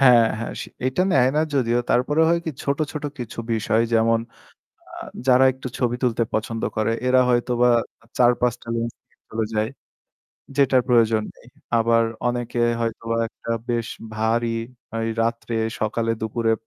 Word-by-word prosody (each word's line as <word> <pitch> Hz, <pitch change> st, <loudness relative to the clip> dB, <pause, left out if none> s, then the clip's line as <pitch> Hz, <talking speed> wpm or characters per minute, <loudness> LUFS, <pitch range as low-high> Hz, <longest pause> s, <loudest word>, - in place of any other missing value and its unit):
হ্যাঁ, 125 Hz, -4 st, +7 dB
হ্যাঁ 115 Hz, -, -4 dB
সে -, -, -8 dB, 0.2 s
এটা 130 Hz, +8 st, +1 dB
নেয় 130 Hz, -1 st, +5 dB
না -, -, +4 dB
যদিও। 120 Hz, -3 st, +2 dB
তারপরেও 145 Hz, +6 st, +3 dB
হয় 170 Hz, -, +2 dB
কি -, -, 0 dB
ছোট, 140 Hz, +1 st, -1 dB
ছোট 150 Hz, -1 st, -5 dB
কিছু 120 Hz, -2 st, -7 dB
বিষয় 110 Hz, 0 st, +2 dB
যেমন 115 Hz, 0 st, +4 dB, 0.7 s
আ -, -, -14 dB, 0.3 s
যারা 130 Hz, 0 st, +6 dB
একটু 130 Hz, 0 st, -7 dB
ছবি 120 Hz, -1 st, +1 dB
তুলতে 120 Hz, -1 st, +2 dB
পছন্দ 115 Hz, +1 st, -2 dB
করে 110 Hz, +1 st, +1 dB, 0.2 s
এরা 130 Hz, 0 st, +5 dB
হয়তোবা 120 Hz, 0 st, +2 dB, 0.5 s
৪-৫ 120 Hz, -1 st, +3 dB
টা -, -, -17 dB
লেন্স 115 Hz, 0 st, -2 dB
নিয়ে -, -, -37 dB
চলে 110 Hz, 0 st, -1 dB
যায়, 110 Hz, 0 st, +1 dB, 0.9 s
যেটার 135 Hz, -2 st, +4 dB
প্রয়োজন 115 Hz, -3 st, +4 dB
নেই। -, -, -20 dB, 0.3 s
আবার 115 Hz, 0 st, +3 dB, 0.2 s
অনেকে 120 Hz, 0 st, -2 dB, 0.2 s
হয়তোবা 115 Hz, 0 st, -2 dB
একটা 115 Hz, -, -9 dB, 0.2 s
বেশ 120 Hz, -1 st, -1 dB, 0.3 s
ভারী, 115 Hz, +1 st, 0 dB, 0.4 s
ওই 115 Hz, -, -1 dB, 0.2 s
রাত্রে-সকালে-দুপুরে 115 Hz, 0 st, -1 dB
115 Hz, 150 wpm, -23 LUFS, 115-125 Hz, 0.9 s, হ্যাঁ